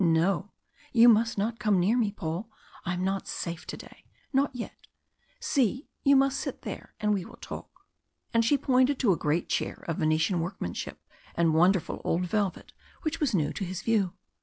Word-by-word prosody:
"No! 175 +4 +2 0.4
you 235 -1 +7
must 225 0 +5
not 225 +3 -1
come 205 -3 +3
near 195 +7 +3
me, 225 -4 +2
Paul. 175 +3 -4 0.4
I 180 0 -1
am 180 - -2
not 195 0 -1
safe 170 0 -4
to - - -5
day. - - -13 0.3
Not 275 +1 +3
yet. 240 - -7 0.5
See, 260 -1 0
you 280 -1 +6
must 275 0 +3
sit - - -5
there - - -7
and 210 0 +2
we 195 -3 -1
will - - -12
talk." - - -8 0.6
And 230 0 +4
she 285 +5 +4
pointed 260 0 +3
to 235 -7 +3
a - - +4
great 155 +2 0
chair - - -2
of 165 - -1
Venetian 160 +3 +2
workmanship 165 - -4 0.4
and 165 -1 +3
wonderful 180 +3 +3
old 180 +2 +1
velvet 200 0 -2 0.3
which 320 +1 -2
was 285 -9 +1
new 150 -5 +1
to 200 - -4
his 185 0 -4
view. 210 -6 +2
200 Hz, 185 wpm, -28 LUFS, 175-235 Hz, 0.6 s, you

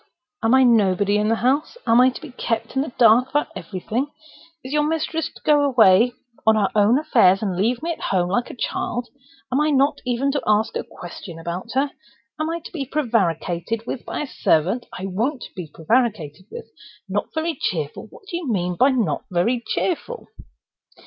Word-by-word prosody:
Am 225 +3 +4
I 265 - +6
nobody 205 -4 +3
in 210 0 +1
the 225 - +2
house? 270 - 0
Am 230 +2 +5
I 255 - +6
to 255 - -8
be 310 -5 -9
kept 230 -2 -3
in 265 - +2
the 285 - -4
dark 240 +2 +5
about 295 +3 0
everything? 215 +8 -3 0.6
Is 260 +2 -6
your 300 - +3
mistress 320 +1 -1
to - - -17
go 295 -1 +5
away 240 -3 +5 0.3
on 220 0 +5
her 205 -3 +2
own 215 +4 +4
affairs, 225 -11 +4
and 195 -4 -1
leave 230 - 0
me 340 - -1
at 330 - -6
home 180 -2 0
like 240 +6 0
a - - -8
child—and 245 0 -3 0.4
am 265 +4 +2
I 305 - +2
not 280 0 +2
even 250 +2 0
to 285 - -1
ask 215 +1 +2
a - - -2
question 175 -1 -10
about 170 +7 -5
her? 275 +1 +1 0.5
Am 310 +1 -1
I 335 +1 -3
to - - -11
be 310 -6 -3
prevaricated 225 - -1
with 245 - -5
by - - -4
a - - -2
servant? 190 - +1
I 185 - -6
won't 230 +9 -2
be 175 -4 -7
prevaricated 190 - -1
with! - - -8 0.4
Not 200 +2 -2
very 320 +1 0
cheerful? 155 +2 -3
What - - -16
do 345 - -3
you 320 -8 -3
mean 180 -3 -1
by 260 - +5
not 230 - 0
very 205 +8 +1
cheerful?" 465 +7 -2
235 Hz, 195 wpm, -22 LUFS, 195-275 Hz, 0.6 s, I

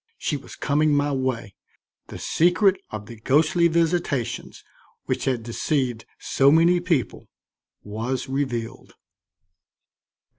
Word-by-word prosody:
She 150 - -2
was 140 - -9
coming 150 +1 +1
my 145 0 +1
way, 130 -6 -2 0.5
the - - -8
secret 185 +3 +2
of 105 -1 -6
the 115 +2 -11
ghostly 155 +8 +3
visitations 160 -8 -1 0.4
which - - -2
had 125 -4 0
deceived 120 0 -2
so 135 0 +3
many 170 +3 +5
people 165 - -2 0.5
was 115 +5 -3
revealed. 130 -3 -4
140 Hz, 110 wpm, -24 LUFS, 120-160 Hz, 0.5 s, many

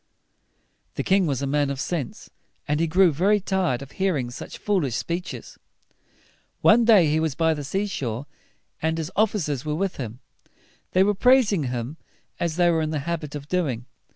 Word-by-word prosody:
The - - -2
king 190 -2 +3
was 140 -2 -1
a - - +1
man 145 +1 +1
of 140 -1 -3
sense, 150 -4 -4 0.4
and 150 +1 0
he 165 - +2
grew 180 +2 +4
very 195 +8 +3
tired 185 -10 0
of 140 - -12
hearing 155 -11 -1
such - - -8
foolish 175 - 0
speeches. 175 +6 -5 1.0
One 230 +2 +6
day 215 -7 +7
he 155 +1 +2
was 160 -4 -1
by 160 -1 +2
the 150 -2 -5
sea 190 +9 -1
shore, 130 - -4 0.6
and 160 +1 0
his 160 -1 -3
of 215 +3 +3
fi 210 - -3
cers 145 -8 -2
were 150 -1 -2
with 190 +3 -2
him. 120 -2 -6 0.7
They 185 - +5
were 205 +1 +2
praising 215 - +4
him, 125 +4 -4 0.4
as 170 -2 -1
they 175 0 +4
were 165 -1 +1
in 155 - -1
the 155 -2 -2
habit 160 -4 -3
of 145 -1 -7
doing. 145 -10 -1
160 Hz, 190 wpm, -24 LUFS, 140-190 Hz, 1.0 s, day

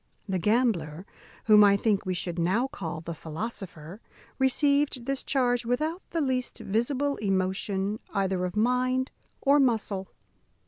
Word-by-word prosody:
The 190 -2 -1
gambler, 190 -6 +1 0.4
whom 210 -2 +7
I 200 -1 +6
think 205 -2 0
we 185 - 0
should 175 -1 -2
now 190 +9 +2
call 170 - -5
the 170 +1 -5
philosopher, 170 +1 -7 0.4
received 280 -1 +2
this 275 0 -1
charge 245 -3 +1
without 305 +9 -1
the 330 - -1
least 255 -3 -1
visible 265 +7 -1
emotion 195 +1 -1
either 190 -2 0
of 180 +1 -3
mind 255 +3 +1 0.3
or 285 +1 +4
muscle. 215 -7 +1
215 Hz, 135 wpm, -27 LUFS, 190-255 Hz, 0.4 s, whom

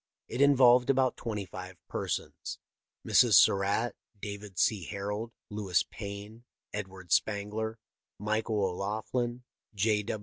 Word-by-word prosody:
It 120 - -2
involved 125 -3 +6
about 130 -2 +3
twenty 105 -4 -4
five 90 0 -9
persons. - - -4 0.5
Mrs. - - +5
Surratt, 100 +4 +4 0.2
David 100 -2 -7
C. 105 -1 +2
Harold, 105 +3 -4 0.2
Lewis 100 -4 +1
Payne, 105 +2 -7 0.3
Edward 95 -3 -6
Spangler, 110 +2 0 0.4
Michael 110 0 0
O'Loughlin, 110 +6 -2 0.3
J. 105 +1 +2
105 Hz, 105 wpm, -30 LUFS, 100-115 Hz, 0.5 s, involved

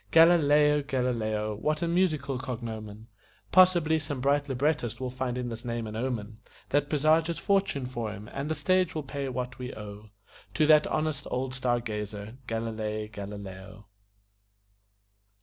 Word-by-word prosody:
Galilei 150 -1 +6
Galileo! 115 -6 -1
What 155 +7 0
a - - +1
musical 165 -7 +1
cognomen! 110 -4 -6 0.5
Possibly 175 -4 +5
some 145 -3 -4
bright 140 +2 +1
librettist 130 -3 0
will 130 -1 -3
find 130 -1 -3
in 125 -1 -3
this 115 0 -6
name 120 -2 -3
an 110 0 -6
omen 110 -3 -3 0.3
That 145 0 +1
presages 160 +3 +3
fortune 195 -9 +1
for 120 -4 -4
him, 105 0 -9
and 140 +2 -3
the 160 - 0
stage 185 -1 +2
will 155 - -2
pay 140 0 -4
what 125 0 -4
we 125 0 -5
owe 105 0 -9 0.5
To 155 - +4
that 150 0 +6
honest 155 -2 -1
old 130 +1 -2
star 125 -2 +1
gazer, 105 +1 -5
Galilei 110 -1 -3
Galileo. 100 0 -8
125 Hz, 150 wpm, -28 LUFS, 110-150 Hz, 0.5 s, Galilei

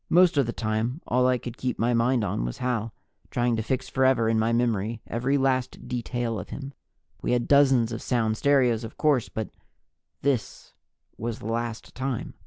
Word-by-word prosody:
Most 180 0 +5
of 140 -4 +3
the - - -1
time, 115 +4 -2
all 125 +1 +2
I 130 0 +3
could 120 -1 -8
keep 130 -1 -2
my 120 +2 +1
mind 120 0 +2
on 80 - -1
was - - -4
Hal, 115 -3 -1 0.4
trying 120 -1 +1
to - - 0
fix 130 +3 -2
forever 130 -3 +3
in 110 0 +2
my 110 +1 +2
memory 115 -2 0
every 125 +5 0
last 130 -2 0
detail 120 -2 -2
of 90 - -8
him. 140 0 -7 0.5
We - - 0
have 120 -1 +1
dozens 135 -5 +5
of 115 - -4
sound 110 -3 +1
stereos, 125 -3 +3
of 115 - -8
course, 145 -6 +2
but 110 -1 -4 0.7
this 135 -5 -2 0.5
was 115 0 -3
the - - -11
last 115 -1 -4
time. 130 -2 -3
120 Hz, 190 wpm, -26 LUFS, 115-130 Hz, 0.7 s, Most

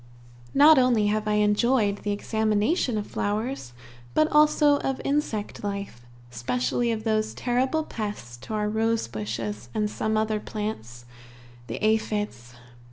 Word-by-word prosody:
Not 295 +1 +8
only 245 -4 +3
have 215 0 -2
I 210 - +1
enjoyed 210 -1 +2
the 205 - -3
examination 220 - 0
of 205 - -2
flowers, 210 - -3 0.4
but 310 - +4
also 300 -1 +5
of 270 -1 -2
insect 275 -10 -2
life, 200 -12 -5 0.2
specially 125 - -1
of 220 -1 -3
those 215 -1 0
terrible 260 +6 0
pests 205 - -6
to 130 - -6
our 210 0 0
rosebushes 115 - -2
and 210 -1 +1
some 220 0 -1
other 215 0 0
plants 120 - -6 0.6
the - - -4
aphides. 210 - -1
215 Hz, 130 wpm, -26 LUFS, 200-240 Hz, 0.6 s, Not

